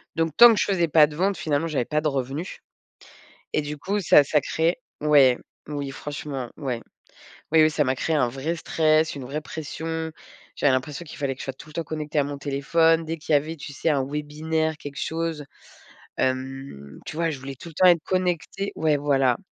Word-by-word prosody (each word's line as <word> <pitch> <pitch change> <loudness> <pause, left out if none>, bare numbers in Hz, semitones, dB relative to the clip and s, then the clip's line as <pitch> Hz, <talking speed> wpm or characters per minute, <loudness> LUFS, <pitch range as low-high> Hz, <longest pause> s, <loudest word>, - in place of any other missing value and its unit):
Donc 165 -1 +1
tant 240 -1 +10
que - - -2
je - - +3
faisais 175 -4 +1
pas 155 0 +6
de 150 - -9
vente, 195 +2 +1
finalement 155 0 -1
j'avais 145 -6 0
pas 150 - 0
de 155 - -1
revenus 140 +5 -3 1.0
et 155 - +2
du 150 0 -6
coup, 200 +6 -1
ça 155 -5 +6
ça 150 +1 +2
crée 165 +4 0 0.2
ouais, 140 -4 +5 0.3
oui, 145 -2 -4
franchement, 140 -3 -6
ouais. 125 -5 -3 0.7
Oui 160 - +6
oui, 155 - +6
ça 150 -1 +1
m'a 130 -1 +1
créé 160 +4 -1
un 135 -4 +3
vrai 135 +7 -3
stress, 155 -1 +2
une 135 - -6
vraie 145 +4 -4
pression. 160 +1 -5 0.4
J'avais 145 - +3
l'impression 140 +5 -2
qu'il 155 - -10
fallait 135 -2 -2
que - - -21
je - - -6
sois 135 - -4
tout 150 - -14
le 155 - -14
temps 165 - -2
connectée 150 -1 -3
à 145 - +3
mon 145 0 -5
téléphone. 160 +4 +2
Dès 165 +1 -3
qu'il 155 - -7
y - - +8
avait, 155 +3 0
tu 145 - -9
sais, 165 - -1
un 140 -3 +2
webinaire, 155 +2 -2
quelque 145 -2 -8
chose, 160 -2 -3 0.7
hem, 130 - -3
tu - - -7
vois? 165 0 +1
Je 140 - -6
voulais 135 +1 -7
tout 170 - -10
le 160 - -14
temps 185 +4 +5
être 170 -3 +5
connectée 185 +2 -1
ouais, 155 -2 +2
voilà. 135 -3 +2
150 Hz, 215 wpm, -24 LUFS, 140-160 Hz, 1.0 s, tant